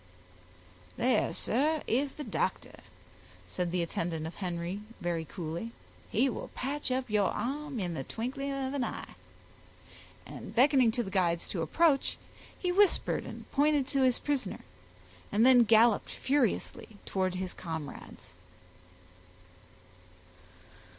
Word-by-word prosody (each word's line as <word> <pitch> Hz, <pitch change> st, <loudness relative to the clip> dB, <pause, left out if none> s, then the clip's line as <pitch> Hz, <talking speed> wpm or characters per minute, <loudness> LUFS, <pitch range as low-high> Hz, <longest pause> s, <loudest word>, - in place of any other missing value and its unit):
"There, 255 Hz, +1 st, +2 dB
sir, 300 Hz, +6 st, +1 dB
is 270 Hz, +4 st, 0 dB
the 300 Hz, -, -6 dB
doctor," 225 Hz, -, -2 dB, 0.7 s
said 180 Hz, -2 st, -2 dB
the 180 Hz, -1 st, +1 dB
attendant 165 Hz, -1 st, -3 dB
of 160 Hz, -, -5 dB
Henry 175 Hz, 0 st, -3 dB, 0.2 s
very 170 Hz, -2 st, -2 dB
coolly. 170 Hz, +7 st, -5 dB, 0.4 s
"He 250 Hz, +5 st, +3 dB
will 255 Hz, -, -4 dB
patch 275 Hz, +2 st, -2 dB
up 255 Hz, 0 st, -1 dB
your 210 Hz, -3 st, +2 dB
arm 275 Hz, +4 st, -3 dB
in 180 Hz, -3 st, -2 dB
the 135 Hz, -, -4 dB
twinkling 265 Hz, -, -4 dB
of 270 Hz, -1 st, -2 dB
an 280 Hz, -3 st, 0 dB
eye"; -, -, -5 dB, 1.1 s
and -, -, -9 dB
beckoning 260 Hz, -1 st, +5 dB
to 240 Hz, -, 0 dB
the 195 Hz, -, -7 dB
guides 175 Hz, -3 st, +1 dB
to 175 Hz, -, -2 dB
approach, 275 Hz, -, +2 dB, 0.4 s
he 360 Hz, -, -1 dB
whispered 400 Hz, +1 st, +3 dB
and -, -, -9 dB
pointed 290 Hz, -1 st, +3 dB
to 275 Hz, -1 st, +1 dB
his 255 Hz, -2 st, +4 dB
prisoner, 270 Hz, -9 st, -2 dB, 0.7 s
and 215 Hz, +4 st, +4 dB
then 250 Hz, -2 st, +7 dB
galloped 225 Hz, 0 st, +5 dB
furiously 250 Hz, -5 st, -1 dB
towards 185 Hz, -1 st, -1 dB
his 185 Hz, 0 st, -3 dB
comrades. 160 Hz, -, -7 dB
235 Hz, 130 wpm, -30 LUFS, 180-275 Hz, 1.1 s, then